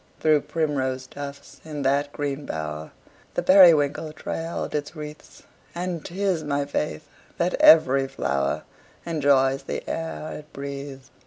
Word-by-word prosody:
Through 155 -2 +4
primrose 130 -5 -1
tufts, 140 0 -9
in 150 -3 -5
that 140 +2 +1
green 145 0 -4
bower, 75 0 -4 0.5
The - - 0
periwinkle 160 -5 +6
trailed 165 +2 -4
its 150 +2 -3
wreaths; 150 -1 -10 0.3
And 175 -2 -3
'tis 185 -2 -1
my 145 -1 -1
faith 150 +2 -3 0.3
that 175 +1 +1
every 135 -4 +6
flower 70 - -1 0.4
Enjoys 140 -4 +2
the - - -5
air 165 -1 -4
it 150 0 -16
breathes. 140 -1 -7
145 Hz, 130 wpm, -25 LUFS, 135-160 Hz, 0.5 s, periwinkle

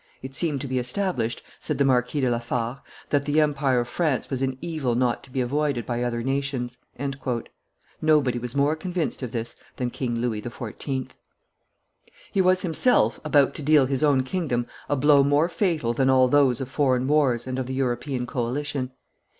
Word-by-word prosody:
"It 135 0 -7
seemed 145 -2 0
to 140 - -4
be 130 0 0
established," 125 - -1 0.2
said - - -3
the 140 - +3
Marquis 130 +2 +2
de 130 - +2
la 120 - +1
Fare, 120 +2 -3 0.3
"that 140 -1 +1
the 150 +1 +2
empire 140 -4 +2
of 120 - -5
France 145 0 -1
was 130 -1 -2
an 130 -1 -1
evil 150 -8 -2
not 120 -1 +1
to - - -14
be 130 - -1
avoided 140 -1 0
by 120 -1 -2
other 120 -1 -1
nations." 135 -2 -2 1.2
Nobody 150 -6 +3
was 125 +1 -5
more 145 +2 +3
convinced 175 -1 -3
of 125 -3 -4
this 115 0 -4 0.2
than 125 -1 -2
King 120 -2 -2
Louis 115 -3 -1
XIV. 125 +3 -5 1.2
He 195 - +2
was 185 0 +3
himself 185 +8 +3
about 145 -3 +3
to - - -7
deal 150 -1 +5
his 135 +2 -1
own 140 -3 +4
kingdom 130 -5 -1 0.2
a 145 - +2
blow 145 0 +5
more 145 +3 +3
fatal 165 - 0
than 135 +2 +2
all 130 -1 +5
those 130 -3 +3
of 130 - -3
foreign 130 -2 +1
wars 135 -5 +2
and 130 0 -3
of 130 - -3
the 130 - -3
European 125 0 -1
coalition. 130 +2 -2
130 Hz, 185 wpm, -25 LUFS, 125-145 Hz, 1.2 s, deal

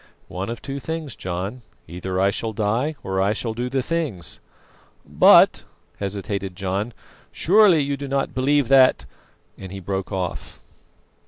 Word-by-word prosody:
"One 95 +3 -4
of 115 -1 -6
two 140 0 -5
things, 160 -3 -5
John: 95 +7 -5 0.3
either 90 +2 -4
I 100 +1 +3
shall 110 +2 -4
die 115 +9 0
or 95 0 -1
I 100 +2 +2
shall 110 +1 -4
do 120 +2 -3
the 135 0 -1
things." 130 - -3 0.7
"But" - - +6 0.4
hesitated 100 -1 -4
John 100 +4 -3 0.4
"surely 190 -3 +5
you 140 0 -1
do 140 0 -6
not 135 0 -1
believe 140 +1 +2
that 135 -1 +5 0.3
" - - -39
and 95 -2 -8
he 95 - -6
broke 95 -1 -4
off. 90 -2 -4
110 Hz, 155 wpm, -22 LUFS, 95-135 Hz, 0.7 s, But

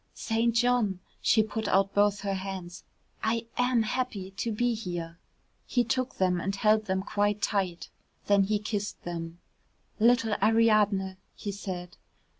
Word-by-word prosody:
"St. 230 +1 0
John," 235 -6 +2 0.2
she 220 - +4
put 220 0 -4
out 195 +1 +2
both 205 0 +3
her 200 -1 -1
hands. 190 -2 -6 0.4
"I 230 +1 0
am 245 -2 +2
happy 215 -5 -3
to 215 +4 -3
be 240 +3 +1
here." 175 -5 -5 0.5
He 245 - +2
took 255 +2 -1
them 180 -2 +1
and 195 +2 -2
held 215 +2 +3
them 190 -1 -1
quite 205 0 0
tight, 190 -5 -1 0.3
then 200 -1 +4
he 210 +2 +1
kissed 205 -1 -4
them. 165 -1 -5 0.6
"Little 230 -1 +4
Ariadne," 210 -4 +3 0.2
he 205 - -5
said. 185 -3 -6
205 Hz, 145 wpm, -28 LUFS, 190-225 Hz, 0.6 s, she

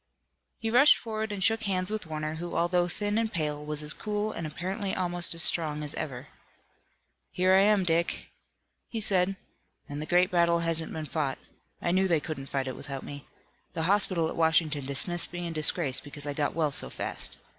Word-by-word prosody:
He 225 -1 -3
rushed 270 +5 +7
forward 220 -1 -4
and 200 -2 -3
shook 225 +2 +2
hands 185 0 0
with 215 -5 -3
Warner 155 0 -3
who 175 +1 -6
although 175 +1 +2
thin 205 +4 -1
and 225 -1 -1
pale 150 -3 -2
was 150 0 -4
as 150 - +1
cool 210 0 -3
and 165 - -4
apparently 190 +6 -3
almost 175 -2 +2
as 165 - +5
strong 150 -3 +2
as 150 - -5
ever. 135 -1 -5 1.0
"Here 185 +1 +2
I 190 - +6
am, 205 -1 +4
Dick," 170 0 -1 0.6
he 230 - -3
said, 195 -2 +2 0.5
"and 145 +1 -6
the 155 - -5
great 180 +1 +3
battle 170 -1 +3
hasn't 165 -1 0
been 155 -1 -5
fought. 145 -3 -2 0.5
I 175 - +1
knew 190 +1 +3
they 170 -4 +3
couldn't 145 -3 -6
fight 135 -1 -2
it 130 - -4
without 135 -1 -6
me. 140 -1 -9 0.5
The 165 - -2
hospital 185 -2 +2
at - - -5
Washington 160 -4 +2
dismissed 170 +5 +3
me 175 0 -5
in 170 - -4
disgrace 155 -3 +2
because 145 0 -6
I 145 - -2
got 145 +1 -1
well 155 -3 +1
so - - -3
fast. - - -5
170 Hz, 200 wpm, -28 LUFS, 150-190 Hz, 1.0 s, rushed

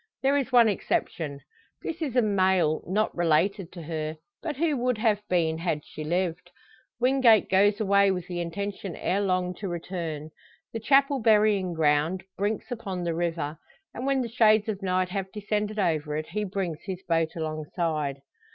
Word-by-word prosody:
There 275 +1 +3
is 275 -2 0
one 240 -2 +7
exception; 155 -7 -2 0.4
this 335 +1 -5
is 275 -6 -2
a 250 - +4
mail 185 -6 +2
not 210 +4 0
related 175 +2 +1
to 170 -2 -8
her, 155 0 -4 0.2
but 310 -3 -3
who 315 -1 +1
would 250 -1 0
have 215 -2 +2
been 165 -3 +1
had 165 -4 -2
she 155 - -8
lived. 175 +2 -1 0.5
Wingate 245 -5 +4
goes 200 +2 +4
away 200 -1 +4
with 180 -3 -1
the 175 -1 -3
intention 195 +2 -4
ere 195 +2 0
long 185 -2 0
to 200 - -4
return. 165 -3 -5 0.4
The 225 - -2
chapel 275 +3 +3
burying 210 -5 +3
ground 155 +4 +2
brinks 205 +4 -2
upon 195 -7 -4
the 170 -1 -1
river, 165 -2 -2 0.3
and 255 +3 -4
when 270 -2 +2
the - - -3
shades 220 -2 +4
of 210 -2 -3
night 185 -1 0
have 190 0 -4
descended 210 0 -2
over 155 -6 0
it, 155 - -5
he 210 0 -2
brings 185 -5 -3
his 190 -2 -6
boat 165 -1 +1
alongside. 155 -3 -2
190 Hz, 170 wpm, -27 LUFS, 165-215 Hz, 0.5 s, one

